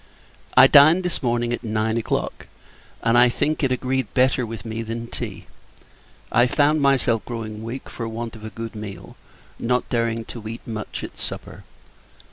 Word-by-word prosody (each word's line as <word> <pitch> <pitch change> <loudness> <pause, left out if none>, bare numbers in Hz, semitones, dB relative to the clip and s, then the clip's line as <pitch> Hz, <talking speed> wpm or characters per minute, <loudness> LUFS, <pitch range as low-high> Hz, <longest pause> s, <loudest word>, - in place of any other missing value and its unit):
I 130 - +11
dined, 155 +6 +7
this 180 -2 -2
morning, 120 -2 0
at 120 - -4
nine 110 0 0
o'clock; 115 - -2 0.6
and, 115 +1 +3
I 125 0 +7
think, 150 +5 0
it 135 - +2
agreed 130 -2 -1
better 130 -2 +3
with 110 -1 -7
me 115 0 -4
than 115 +1 -4
tea. - - -6 0.9
I 120 +2 +5
found 150 +3 +3
myself 130 -6 +3
growing 110 -3 -6
weak, 115 +4 -6
for 115 - -5
want 115 +1 -5
of 110 - -12
a 110 - -5
good 115 +2 -7
meal, 105 -3 -8 0.4
not 125 +1 0
daring 115 -1 0
to 110 -2 -8
eat 115 +1 -7
much 110 -2 -5
at - - -8
supper. - - -6
115 Hz, 170 wpm, -23 LUFS, 110-130 Hz, 0.9 s, I